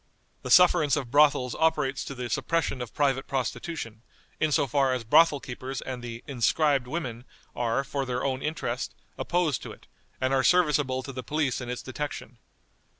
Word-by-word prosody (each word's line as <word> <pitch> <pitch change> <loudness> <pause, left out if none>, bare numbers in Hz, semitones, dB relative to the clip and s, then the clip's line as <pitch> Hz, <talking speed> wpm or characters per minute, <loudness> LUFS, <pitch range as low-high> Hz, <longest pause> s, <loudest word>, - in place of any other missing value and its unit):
"The - - -6
sufferance 165 -5 +6
of 135 -6 -4
brothels 140 -3 +4
operates 150 -4 +1
to 140 - -6
the 125 -1 -4
suppression 160 -1 -1
of 120 - -6
private 135 -2 0
prostitution, 130 -3 -4 0.4
in 155 - +1
so 145 - +3
far 135 0 +2
as 125 -2 -2
brothel 145 +6 +5
keepers 130 +1 -6
and 130 -2 -6
the 115 -1 -7
'inscribed' 140 +1 +1
women 125 -5 -4 0.3
are, 120 +2 0
for 140 0 -3
their 125 -1 -2
own 130 -1 -1
interest, 135 -5 -3 0.2
opposed 170 -7 0
to - - -8
it, - - -14 0.3
and 130 +1 0
are 135 -1 +3
serviceable 145 -6 +2
to 135 - -7
the 130 - -5
police 140 0 -1
in 120 - -6
its 125 - -4
detection. 130 -2 -6
135 Hz, 175 wpm, -27 LUFS, 125-150 Hz, 0.4 s, sufferance